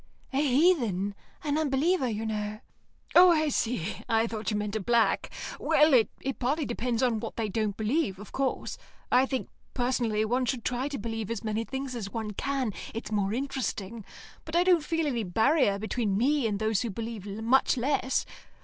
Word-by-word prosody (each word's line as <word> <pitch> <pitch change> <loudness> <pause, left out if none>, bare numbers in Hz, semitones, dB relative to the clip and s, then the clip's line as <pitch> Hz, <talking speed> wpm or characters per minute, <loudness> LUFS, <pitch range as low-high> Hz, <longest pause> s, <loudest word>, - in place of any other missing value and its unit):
"A 270 - +2
heathen. 250 - +2 0.3
An 295 0 0
unbeliever, 295 +1 +2
you 220 0 -3
know." 215 -1 -3 0.5
"Oh, 360 +1 +9
I 310 -2 +2
see. 225 - -1
I 225 0 +3
thought 225 -1 -3
you 210 - 0
meant 210 0 -3
a - - +1
black. 230 +3 +2 0.3
Well, 305 0 +4
it 260 +2 +1
partly 285 +5 0
depends 240 0 -1
on 235 -3 +2
what - - -6
they 220 -2 -2
don't 210 0 -1
believe, 220 - 0
of 205 +1 -11
course. 270 -1 -2 0.3
I 260 +1 +5
think, 260 -1 -3 0.3
personally, 240 -4 +1
one 250 +3 +1
should 245 -3 -2
try 255 +2 -1
to 285 -1 -4
believe 225 -1 -4
as 230 - -3
many 220 +1 -1
things 265 0 -4
as 210 -5 -4
one 220 -2 -3
can, 260 0 -2 0.2
it's 225 - -5
more 200 -2 +1
interesting; 235 -4 -3 0.4
but 315 - -6
I 350 - +5
don't 355 -4 +4
feel 325 +1 0
any 250 -6 0
barrier 220 - +3
between 215 -1 -1
me 270 +2 +2
and 205 -2 -1
those 220 -1 +1
who 235 - -2
believe 220 -1 -5
much 225 +7 +2
less. 260 +1 0
235 Hz, 185 wpm, -28 LUFS, 215-275 Hz, 0.5 s, Oh